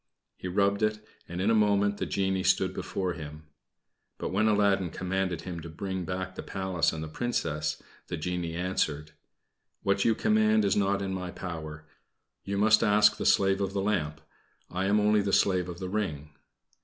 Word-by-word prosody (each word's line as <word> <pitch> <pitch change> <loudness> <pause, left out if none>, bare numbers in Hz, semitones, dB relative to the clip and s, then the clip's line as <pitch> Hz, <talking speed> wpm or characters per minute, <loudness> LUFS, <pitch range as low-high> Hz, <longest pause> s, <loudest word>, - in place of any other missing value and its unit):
He - - -7
rubbed 100 +2 +1
it, 105 0 0 0.2
and 85 +1 -5
in 100 +4 +2
a - - +4
moment 100 -1 +3
the - - -3
genie 95 -1 0
stood 95 0 +2
before 95 -1 -3
him. 75 -2 -8 0.7
But - - -3
when 105 +4 +2
Aladdin 100 -3 +3
commanded 90 -1 -2
him 90 -2 -6
to 85 0 -8
bring 95 +2 -4
back 95 +2 -4
the - - -6
Palace 95 -3 -1
and 80 -1 -5
the - - -5
Princess, 80 -5 -2 0.2
the 85 - -4
genie 85 0 -3
answered 80 -4 -1 0.7
"What 100 0 +2
you 115 - +3
command 110 0 +3
is 100 - +2
not 100 -1 +1
in 95 -1 -3
my 90 -1 -4
power. 80 -4 -7 0.6
You 100 0 -3
must 105 +1 +5
ask 105 -1 +5
the - - -1
slave 95 0 +3
of 95 -1 -1
the 100 - 0
lamp. 80 -7 -1 0.5
I 95 +2 -1
am 105 +2 +3
only 105 0 +3
the 100 0 -1
slave 90 -3 +2
of 85 - -6
the 95 - -5
ring." 80 -8 -3
95 Hz, 185 wpm, -28 LUFS, 85-100 Hz, 0.7 s, must